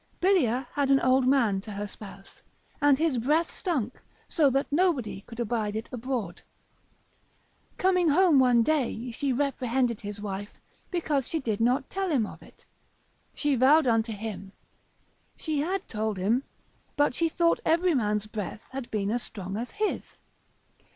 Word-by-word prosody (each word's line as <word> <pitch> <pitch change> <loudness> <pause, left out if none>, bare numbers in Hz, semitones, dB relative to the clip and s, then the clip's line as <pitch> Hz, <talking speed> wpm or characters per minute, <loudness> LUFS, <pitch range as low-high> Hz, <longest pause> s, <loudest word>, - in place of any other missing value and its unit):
Bilia 270 - +2
had 285 -2 0
an 275 0 +5
old 255 0 +3
man 235 -8 +3
to 210 - -11
her 205 +1 -4
spouse, 200 -1 -12 0.4
and 290 -1 +5
his 310 -5 +1
breath 300 +8 +1
stunk, 265 - -2 0.3
so 300 -5 +3
that 270 +1 +1
nobody 290 - +1
could 230 0 -10
abide 220 -2 -1
it 220 +1 -4
abroad; 240 -7 -4 1.4
coming 365 -2 +3
home 325 -1 +5
one 245 -3 +5
day 250 -4 -1
he 270 +4 -1
reprehended 255 -3 0
his 205 0 -6
wife, 205 0 -6 0.3
because 305 -7 -1
she 325 - -1
did 225 -6 -2
not 255 +4 +2
tell 385 -1 -2
him 265 -9 +2
of - - -10
it: - - -19 0.7
she 295 -1 +1
vowed 275 +5 +5
unto 225 -1 +2
him, 205 -2 -6 0.9
she 310 -3 -2
had 370 +6 -2
told 215 -1 -2
him, 225 +8 +1 0.5
but 290 -3 +3
she 330 +5 +1
thought 335 +1 +2
every 340 +2 +3
man's 210 -5 0
breath 215 0 -6
had 260 -2 -6
been 205 -1 -1
as 240 +1 -1
strong 195 -4 -7
as 235 +3 -4
his. 425 -1 -3
255 Hz, 155 wpm, -27 LUFS, 220-295 Hz, 1.4 s, an